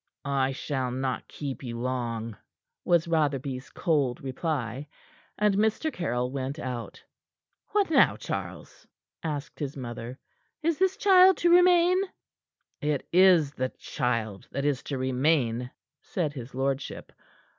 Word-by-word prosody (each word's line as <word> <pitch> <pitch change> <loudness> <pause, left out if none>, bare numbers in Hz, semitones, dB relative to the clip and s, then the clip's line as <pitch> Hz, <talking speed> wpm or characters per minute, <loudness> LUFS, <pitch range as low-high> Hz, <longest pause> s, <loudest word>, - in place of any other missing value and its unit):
"I 135 -1 +1
shall 130 -1 -2
not 130 +1 -3
keep 140 -3 -6
you 120 -3 -5
long," 120 -3 -3 0.5
was 170 -1 +3
Rotherby's 140 -5 -1
cold 145 -8 0
reply, 135 -1 -3 0.5
and 210 -1 +3
Mr. 220 +10 +1
Caryll 125 -8 -1
went 135 +1 -3
out. 125 -6 -6 0.6
"What 405 -5 +1
now, - - +5
Charles?" - - -6 0.3
asked 150 -2 -5
his 145 -2 -4
mother. 120 0 -6 0.5
"Is 330 -1 +1
this 380 0 +2
child 380 -1 +6
to 345 - +3
remain?" 360 +1 +6 0.8
"It 150 -2 -1
is 180 -5 +6
the 130 -1 -2
child 110 -5 -2
that 140 +2 -3
is 140 -3 +1
to 140 - -3
remain," 130 -2 +1 0.3
said 160 -6 -2
his 125 -2 -8
lordship. 135 +1 -2
140 Hz, 125 wpm, -27 LUFS, 125-170 Hz, 0.8 s, child